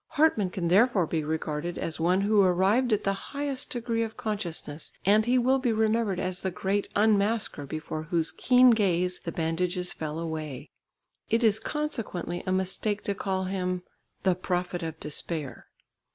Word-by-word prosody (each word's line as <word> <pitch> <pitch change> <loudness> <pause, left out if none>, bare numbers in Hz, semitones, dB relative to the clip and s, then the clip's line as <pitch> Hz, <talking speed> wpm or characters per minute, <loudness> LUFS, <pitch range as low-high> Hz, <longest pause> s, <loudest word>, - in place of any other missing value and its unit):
Hartmann 285 -11 +3
can 180 -1 -3
therefore 200 0 +4
be 160 0 -2
regarded 155 +2 -3
as 165 - -4
one 180 +4 +2
who 205 +1 +4
arrived 195 +7 +3
at 210 - +2
the 195 - +1 0.2
highest 280 -1 -3
degree 230 -1 -2
of 225 -1 -3
consciousness, 170 -8 -4
and 215 +3 +4
he 250 +1 +4
will 260 +2 +3
be 250 -2 +1
remembered 220 -3 +1
as 185 -1 -2
the 190 - -2
great 195 +3 -1
unmasker 205 -7 +2
before 155 +1 -4
whose 165 0 -1
keen 250 - +5
gaze 180 -5 +1
the 165 - -2
bandages 180 +2 -1
fell 155 -1 -5
away. 155 -5 -5 0.6
It 230 +2 +2
is 220 -1 +4
consequently 230 - -3
a - - +1
mistake 190 +2 -1
to 200 - -1
call 190 -1 -2
him 185 -1 -2 0.4
"the 190 - +4
prophet 180 0 -2
of 160 -1 -5
despair." 150 -1 -3
190 Hz, 165 wpm, -27 LUFS, 170-220 Hz, 0.6 s, keen